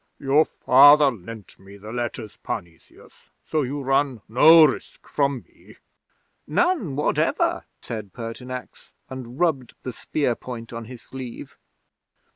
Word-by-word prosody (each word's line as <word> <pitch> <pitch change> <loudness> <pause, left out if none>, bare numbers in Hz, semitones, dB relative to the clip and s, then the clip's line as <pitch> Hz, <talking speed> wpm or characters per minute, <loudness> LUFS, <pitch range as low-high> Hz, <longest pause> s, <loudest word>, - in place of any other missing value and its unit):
"Your 145 +3 +3
Father 145 +2 +6
lent 110 -1 -11
me 100 +1 -14
the 105 +2 -10
letters, 120 -2 -5
Parnesius, 85 -5 -9 0.2
so 155 - 0
you 140 +1 -4
run 135 -3 0
no 155 +8 +7
risk 140 - -4
from 140 -3 -1
me." - - -20 0.7
'"None 350 - 0
whatever," 150 - 0 0.2
said 110 -4 -6
Pertinax, 125 +3 -8 0.2
and 130 -1 -8
rubbed 145 -9 0
the 130 - -5
spear 140 +1 -1
point 120 -1 -9
on 115 0 -6
his 120 0 -11
sleeve. 130 -3 -9
125 Hz, 125 wpm, -23 LUFS, 115-145 Hz, 0.7 s, no